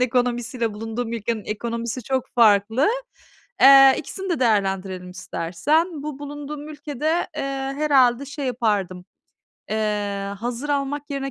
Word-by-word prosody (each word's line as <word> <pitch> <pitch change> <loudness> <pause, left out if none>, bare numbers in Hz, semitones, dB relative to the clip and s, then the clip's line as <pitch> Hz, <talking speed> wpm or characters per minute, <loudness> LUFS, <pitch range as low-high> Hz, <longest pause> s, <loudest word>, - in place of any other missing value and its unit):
ekonomisiyle 245 -2 0
bulunduğum 225 +2 -4
ülkenin 225 -1 -3
ekonomisi 235 +3 -4
çok 260 +1 -1
farklı. 225 - +4 0.7
Eee, 270 -1 +9
ikisini 385 +5 -6
de 335 - -1
değerlendirelim 195 -5 0
istersen. 280 - -1
Bu 295 -2 -5
bulunduğum 290 +1 -7
ülkede, 300 +2 -2
eee, - - -2 0.3
herhâlde 275 -4 +3
şey 280 0 -5
yapardım, 205 -7 -1 0.7
eee, 205 -2 -2
hazır 245 +5 -4
almak 285 0 -2
yerine 275 -1 -3
245 Hz, 115 wpm, -23 LUFS, 210-285 Hz, 0.7 s, Eee